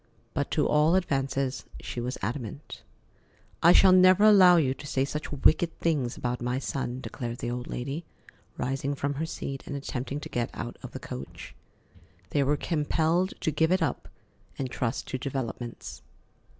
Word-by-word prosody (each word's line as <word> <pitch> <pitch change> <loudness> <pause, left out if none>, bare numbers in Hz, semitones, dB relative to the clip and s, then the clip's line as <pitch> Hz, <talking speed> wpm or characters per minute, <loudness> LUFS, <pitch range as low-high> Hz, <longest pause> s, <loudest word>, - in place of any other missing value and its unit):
But - - -1
to - - +1
all 150 +3 +4
advances 135 -6 0 0.2
she 120 - -5
was 125 +2 -3
adamant. 120 +5 -5 0.8
"I 170 - +7
shall 190 +1 +7
never 185 +2 +6
allow 190 -4 +8
you 135 -5 +2
to 145 - -10
say 135 -1 +1
such 150 +2 -5
wicked 155 +4 +2
things 140 -7 0
about 125 0 -2
my 125 +1 -1
son," 130 -2 -3
declared 120 -3 -5
the 120 - -3
old 125 0 -4
lady, 140 +7 -4 0.5
rising 135 +2 -2
from 140 +1 -1
her 155 +3 -3
seat 135 -3 -5
and 145 - -4
attempting 135 0 -4
to - - -6
get 120 -1 -2
out - - -5
of - - -9
the - - -5
coach. 65 +2 -8 0.8
They 145 - +2
were 145 +2 +2
compelled 165 +4 0
to 160 - +1
give 160 +3 +2
it 185 -1 +3
up 145 - -3 0.5
and 130 -2 -3
trust 120 -2 -2
to 130 - -3
developments. 120 - -5
140 Hz, 170 wpm, -28 LUFS, 125-160 Hz, 0.8 s, allow